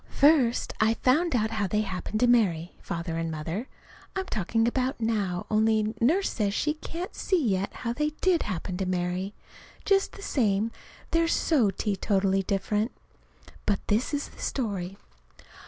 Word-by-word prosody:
First 280 -5 +3
I 220 +1 +3
found 295 +6 +2
out 220 -1 +1
how 215 -3 0
they 210 +3 +1
happened 200 +2 -3
to - - +6
marry 190 -9 +3
Father 165 -1 -4
and 165 0 -1
Mother, 160 +9 -4 0.5
I'm 380 0 -1
talking 225 - 0
about 255 +1 0
now 205 -6 -1
only 215 0 +3
Nurse 340 +12 +3
says 205 -3 0
she 300 +6 +1
can't 335 +3 -6
see 375 -3 +1
yet 195 0 0
how 235 -1 -3
they 300 +4 0
did 365 -3 +3
happen 180 -2 -3
to 190 -1 -2
marry, 185 +2 -2 0.5
just 395 -1 +3
the 400 - -10
same, 220 - +1 0.4
they're 330 0 +3
so 290 -9 +3
teetotally 195 -1 +1
different. 205 +4 0 0.8
But 205 -2 +2
this 215 +4 +1
is 290 -1 -2
the - - -14
story. 195 -7 -2
215 Hz, 155 wpm, -27 LUFS, 195-260 Hz, 0.8 s, to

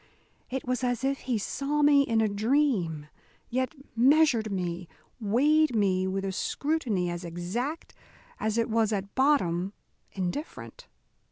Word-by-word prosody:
It 265 +1 -4
was 255 0 -1
as 245 -1 -1
if 275 0 0
he 245 -3 -1
saw 285 +7 -1
me 290 -1 +6
in 230 -5 +1
a 220 - +3
dream, 205 - +1 0.5
yet 260 +5 -1 0.2
measured 250 -3 +4
me, 180 -2 -3 0.3
weighed 275 +6 +3
me 190 -3 +2
with 195 +1 -2
a 195 - -1
scrutiny 225 - -1
as 175 +1 -5
exact 185 - -4 0.5
as 220 +1 -1
it 230 - +2
was 225 -1 +1
at 200 -1 -3
bottom 200 - +2 0.4
indifferent. 290 - -5
225 Hz, 140 wpm, -28 LUFS, 190-275 Hz, 0.5 s, me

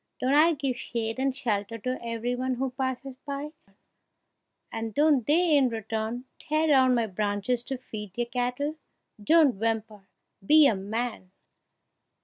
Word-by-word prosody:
Don't 260 +2 +1
I 315 +3 +5
give 270 -3 -2
shade 225 0 -3
and 265 0 0
shelter 220 -3 -2
to 255 +3 -4
every 230 +1 -2
one 255 +1 -1
who 260 +1 -2
passes 260 0 -4
by, 285 +1 -5 1.2
and 225 -2 -5
don't 290 -5 +3
they 325 +1 +4
in 270 -3 +4
return 225 +2 -4
tear 310 +1 0
down 260 -4 +4
my 235 -1 +1
branches 205 +4 -1
to 265 - -4
feed 210 -6 -8
their 240 - -1
cattle? 250 +5 -2 0.5
Don't 300 -5 +4
whimper 220 -3 -2 0.4
be 305 +8 +7
a 275 - +5
man!" 215 0 -4
245 Hz, 145 wpm, -27 LUFS, 225-275 Hz, 1.2 s, be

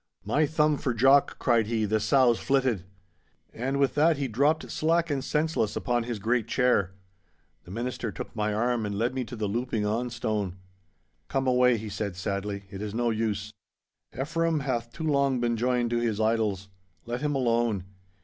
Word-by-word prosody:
'My 145 +8 +2
thumb 150 -1 +2
for 125 -3 -1
Jock!' 135 +4 +4
cried 115 -4 +2
he, 110 -1 0
'the 110 +1 +1
sow's 120 +2 +3
flitted!' 130 -9 +1 0.7
And 135 +4 -2
with 140 -1 +2
that 155 +1 +3
he 140 -1 -1
dropped 145 +7 +1
slack 165 +1 +1
and 135 -2 -1
senseless 150 -8 0
upon 120 -1 0
his 120 -2 -3
great 115 +2 0
chair. 120 -7 +2 0.7
The - - -13
Minister 115 +2 -3
took - - -8
my 105 -1 0
arm 120 +2 0
and 100 -1 -3
led 115 +4 0
me 130 -1 -2
to 120 - -8
the 110 -2 -2
louping 115 0 -1
on 115 +4 -1
stone. 105 -5 -2 0.7
'Come 135 0 -1
away,' 125 -1 +4
he 110 0 -6
said 100 -2 -4
sadly, 100 +1 -3
'it 100 0 -7
is 105 0 -4
no 120 0 +1
use. 110 -2 -2 0.7
Ephraim 165 +2 0
hath 120 -4 -2
too 160 - -7
long 140 -3 +2
been 120 -1 +1
joined 120 0 0
to 120 - +1
his 115 -3 -1
idols. 110 -3 0 0.4
Let 120 +2 -4
him 150 -1 0
alone. 115 -6 +1
120 Hz, 180 wpm, -27 LUFS, 110-135 Hz, 0.7 s, Jock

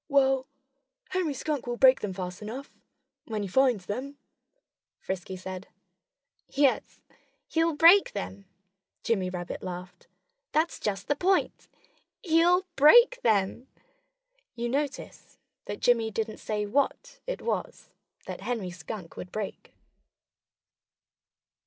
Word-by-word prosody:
"Well, 270 -2 +3 0.6
Henry 360 -6 0
Skunk 295 -3 -3
will 240 0 -2
break 260 0 +6
them 205 - -2
fast 180 0 -6
enough, 245 +7 -7 0.5
when 215 -2 -3
he - - -3
finds 240 -2 +2
them," 270 +8 -5 0.8
Frisky 190 0 -5
said. 185 0 -7 0.8
"Yes, 275 -2 +1 0.5
he'll 325 -1 +1
break 335 +6 +7
them!" 195 -1 -6 0.6
Jimmy 195 -6 0
Rabbit 175 -1 -5
laughed. 180 -1 -8 0.5
"That's 315 +3 +1
just 195 -3 -3
the 290 - +2
point! 380 +4 0 0.6
He'll 345 +2 +4
break 480 - +7
them!" 215 +3 +1 0.9
You 240 0 -2
notice 280 +2 -4 0.3
that 205 - -6
Jimmy 230 -2 +3
didn't 220 0 -3
say 210 -1 -2
what 280 - -1
it - - -4
was - - -3 0.3
that - - -7
Henry 220 -7 -3
Skunk 175 +1 -8
would 180 - -7
break. 215 -2 -6
240 Hz, 115 wpm, -28 LUFS, 195-290 Hz, 0.9 s, break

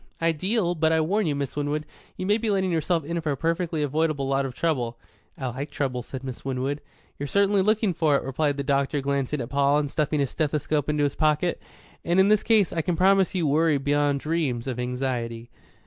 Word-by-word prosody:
"Ideal. 175 +4 +1
But 160 -1 +1
I 160 - +3
warn 190 +5 +1
you, 145 - 0
Miss 140 -2 -3
Winwood, 145 +1 -2 0.3
you 185 - -3
may 205 +3 +2
be 225 - -1
letting 190 -2 +1
yourself 165 -1 0
in 170 +2 -2
for 155 -2 -1
a - - -5
perfectly 165 0 -1
avoidable 150 -1 0
lot 135 0 +1
of 125 - -9
trouble." 125 -8 -1 0.4
"I 135 - -5
like 130 +4 -4
trouble," 130 -3 -2
said 130 +2 -8
Miss 130 -2 -7
Winwood. 135 +2 -2 0.4
"You're 145 - -3
certainly 200 +3 +3
looking 215 -1 +2
for 155 -3 +2
it," - - 0
replied 140 +2 -1
the 140 - -2
doctor 140 +1 +1
glancing 140 0 -1
at 120 - -5
Paul 140 +1 +3
and 145 -2 -1
stuffing 150 -1 0
his 140 -2 0
stethoscope 150 -1 -1
into 150 -1 +1
his 140 -1 +1
pocket. 155 +2 +1 0.4
"And 175 +2 +2
in 190 +1 +5
this 215 -1 +4
case, 215 -5 +3
I 165 - 0
can 175 +2 -1
promise 190 +2 +3
you 175 -3 +1
worry 155 +1 +3
beyond 145 0 +1
dreams 150 -7 -1
of 130 -2 -3
anxiety." 125 -2 -3
150 Hz, 215 wpm, -25 LUFS, 135-170 Hz, 0.4 s, in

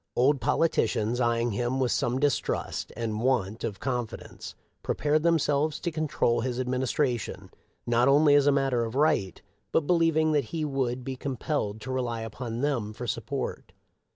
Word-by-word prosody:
Old 135 +2 +3
politi 165 -6 +2
cians, 115 +2 -1
eying 120 0 +1
him 120 +5 -1
with 130 -2 +1
some 120 +1 0
distrust 145 -1 -1
and 110 -2 -2
want 115 -5 0
of 105 -5 -3
con 125 -3 -1
fidence, - - -10 0.3
prepared 150 +1 +1
themselves 155 -2 +1
to 170 - -2
control 145 -7 0
his 125 0 -2
adminis 130 0 -1
tration, 125 -7 -1 0.3
not 120 +1 +3
only 145 +1 +5
as 145 -1 +5
a - - +6
matter 135 -4 +1
of 115 +1 -5
right, 135 - +1 0.3
but - - +3
believing 165 -2 +3
that 145 -4 +2
he 155 +6 -3
would 130 -3 -1
be 135 0 -4
compelled 130 -5 -3
to 130 - -5
rely 120 -3 -2
upon 115 +2 -5
them 125 -8 -1
for 120 +3 -6
support. - - -4
130 Hz, 170 wpm, -27 LUFS, 120-145 Hz, 0.3 s, a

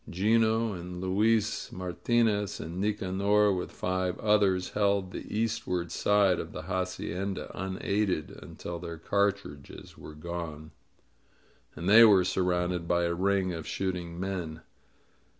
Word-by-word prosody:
'Gino, 110 +3 +2
and 90 0 -7
Luis 105 +4 +1
Martinez, 105 +2 0
and 85 +4 -5
Nicanor, 100 0 +2
with 90 -1 -3
five 90 0 -2
others, 100 -4 +2
held 100 -2 +1
the - - -8
eastward 90 -6 -1
side 100 -2 +3
of - - -6
the - - -6
hacienda 95 +1 -3
unaided 95 -2 -1
until 85 -1 -7
their 85 -1 -7
cartridges 100 -5 -2
were 75 - -10
gone, 80 -1 -6 1.0
and 85 +3 -5
they 110 +4 +9
were 100 -5 +7
sur 95 - 0
rounded 90 -1 0
by 85 0 +2
a 85 0 0
ring 95 0 +1
of 80 -2 -6
shooting 90 -3 -3
men. 90 -4 -4
95 Hz, 130 wpm, -29 LUFS, 85-100 Hz, 1.0 s, they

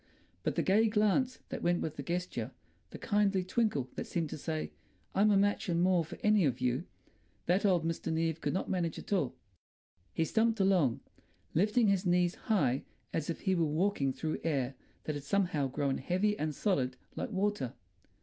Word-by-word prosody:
But - - -1
the - - +1
gay 215 +4 +4
glance 220 +4 +2
that 260 - -4
went 175 0 +2
with 155 -1 -3
the 145 - -5
gesture, 175 +5 -3 0.4
the - - -8
kindly 205 -3 +1
twinkle 185 - 0
that - - -5
seemed 165 -3 -2
to - - -4
say, 155 +1 -3 0.4
"I'm 205 +2 +4
a 205 - +5
match 205 +1 +1
and 170 -1 +1
more 180 -1 +3
for 155 - -9
any 210 -2 +4
of 130 -4 +1
you"—that 125 - -2
old 175 -4 +2
Mr. 165 -1 -2
Neave 160 0 0
could - - 0
not 185 - -2
manage 175 -3 -1
at - - -5
all. 145 -10 0 0.8
He 165 - 0
stumped 225 +4 +2
along, 180 -11 +3 0.5
lifting 210 +7 +3
his 195 -2 +2
knees 175 -1 +2
high 145 - +1 0.3
as 160 -1 -2
if 165 - -3
he 190 - +1
were 170 -2 +2
walking 155 -2 +1
through 155 +4 -3
air 140 -5 0 0.3
that 155 - -2
had 145 -1 -5
somehow 155 -3 +1
grown 135 0 -1
heavy 185 +9 +1
and 155 -5 -2
solid 130 -11 0 0.2
like - - -3
water. 195 - -1
175 Hz, 185 wpm, -32 LUFS, 150-200 Hz, 0.8 s, a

